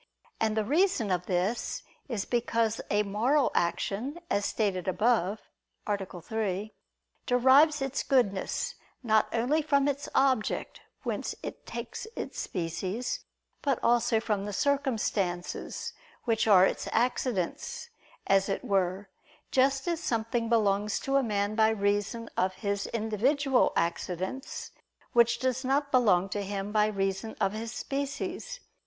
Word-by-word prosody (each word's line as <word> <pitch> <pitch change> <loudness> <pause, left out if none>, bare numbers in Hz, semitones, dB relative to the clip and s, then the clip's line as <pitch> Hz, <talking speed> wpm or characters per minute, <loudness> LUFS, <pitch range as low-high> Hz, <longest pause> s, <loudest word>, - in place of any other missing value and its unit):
And 220 -1 +1
the 215 - +1
reason 295 - +2
of 180 -1 -1
this 190 +5 -1 0.3
is 220 -6 -2
because 230 -2 0
a 205 0 +3
moral 240 +8 +2
action, 200 - -1
as 200 0 +1
stated 195 -5 -1
above 210 0 +1 0.4
(A. 195 -4 -3
3), 210 +1 -2 0.5
derives 270 +4 +5
its 270 -1 -1
goodness 255 - +1 0.3
not 220 -2 +3
only 250 +7 +2
from 280 -2 +2
its 285 0 -2
object, 260 -5 +1 0.2
whence - - -3
it - - -7
takes 235 - -6
its - - -5
species; 185 +6 -3 0.4
but 275 -4 +1
also 235 -1 +3
from 210 -3 -1
the 205 - -4
circumstances, 220 -10 -1 0.3
which 225 -2 +1
are 190 -3 +7
its - - -2
accidents, 250 - -1 0.3
as 195 0 +3
it 195 - -2
were; 195 0 0 0.4
just 270 +2 +2
as 340 -2 0
something 230 -3 -1
belongs 210 -2 +2
to 275 - -1
a - - +4
man 205 -3 0
by 220 0 +4
reason 205 +2 0
of 185 0 +1
his 200 -1 -2
individual 250 +5 +2
accidents, 180 +8 -2 0.4
which 235 0 +5
does 260 +1 -1
not 280 +2 +1
belong 200 -8 +4
to 205 +1 -3
him 200 0 -4
by 210 0 +3
reason 195 +1 -2
of 195 -2 +2
his 220 +1 -4
species. 285 - -4
220 Hz, 135 wpm, -29 LUFS, 200-260 Hz, 0.5 s, are